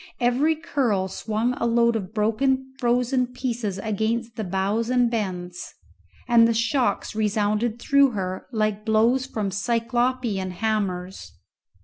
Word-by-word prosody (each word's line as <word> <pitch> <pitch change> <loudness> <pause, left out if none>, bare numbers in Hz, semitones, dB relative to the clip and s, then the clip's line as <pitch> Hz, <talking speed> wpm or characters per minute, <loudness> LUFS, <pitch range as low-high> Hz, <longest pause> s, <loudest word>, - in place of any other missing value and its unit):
Every 255 +6 +2
curl 235 - 0
swung 220 +5 -1
a 235 - 0
load 235 0 +3
of 195 -3 -4
broken 260 +5 0
frozen 250 +1 +1
pieces 240 -5 -3
against 220 +3 -2
the 220 - -3
bows 200 +5 -1
and 245 -2 +2
bends, 180 -5 -4 0.5
and 235 -2 +6
the 230 - +1
shocks 235 -1 0
resounded 215 +1 0
through 280 +3 +4
her 185 -2 -4
like 215 -2 -1
blows 230 +4 +2
from 205 -3 -3
cyclopean 235 -1 0
hammers. 190 -3 -3
225 Hz, 125 wpm, -24 LUFS, 205-245 Hz, 0.5 s, and